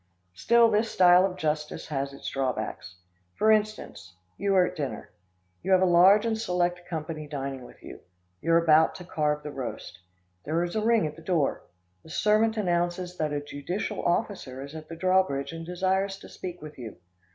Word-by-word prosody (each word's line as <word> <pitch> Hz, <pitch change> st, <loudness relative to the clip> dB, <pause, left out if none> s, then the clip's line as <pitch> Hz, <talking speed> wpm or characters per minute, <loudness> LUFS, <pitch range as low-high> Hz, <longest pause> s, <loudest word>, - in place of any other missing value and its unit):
Still 235 Hz, -, +4 dB
this 215 Hz, +1 st, +1 dB
style 180 Hz, +1 st, +6 dB
of 185 Hz, -1 st, -8 dB
justice 150 Hz, -2 st, -3 dB
has 140 Hz, -2 st, -2 dB
its 140 Hz, -, -9 dB
drawbacks. 110 Hz, -8 st, -3 dB, 0.4 s
For 220 Hz, -, +3 dB
instance, 215 Hz, -, -1 dB, 0.2 s
you 200 Hz, 0 st, 0 dB
are 185 Hz, -1 st, +5 dB
at -, -, -5 dB
dinner. 140 Hz, -4 st, -5 dB, 0.5 s
You 190 Hz, -, +1 dB
have 185 Hz, -, +5 dB
a -, -, +5 dB
large 185 Hz, +5 st, +6 dB
and 225 Hz, -1 st, +1 dB
select 180 Hz, -4 st, -1 dB
company 155 Hz, -2 st, -5 dB
dining 135 Hz, -2 st, -5 dB
with -, -, -16 dB
you. -, -, -10 dB, 0.4 s
You 165 Hz, +2 st, +1 dB
are 170 Hz, 0 st, +5 dB
about 160 Hz, 0 st, +5 dB
to 180 Hz, -, -8 dB
carve 150 Hz, -3 st, -1 dB
the 150 Hz, -, -6 dB
roast 130 Hz, -9 st, -7 dB, 0.4 s
There 165 Hz, +3 st, 0 dB
is 175 Hz, +2 st, -4 dB
a 215 Hz, -, +1 dB
ring 225 Hz, -2 st, +3 dB
at 150 Hz, 0 st, -4 dB
the -, -, -11 dB
door. 165 Hz, -4 st, -1 dB, 0.3 s
The -, -, -16 dB
servant 215 Hz, +5 st, +2 dB
announces 175 Hz, -2 st, -1 dB
that 155 Hz, -1 st, -1 dB
a 145 Hz, -1 st, -2 dB
judicial 175 Hz, +9 st, -4 dB
officer 175 Hz, -, -2 dB
is 140 Hz, +1 st, -10 dB
at 155 Hz, -1 st, -9 dB
the 165 Hz, -, -6 dB
drawbridge 185 Hz, -6 st, +1 dB
and 165 Hz, 0 st, -8 dB
desires 190 Hz, +2 st, 0 dB
to -, -, -13 dB
speak 180 Hz, -3 st, -8 dB
with 150 Hz, -3 st, -10 dB
you. 115 Hz, -4 st, -8 dB
175 Hz, 190 wpm, -27 LUFS, 150-190 Hz, 0.5 s, style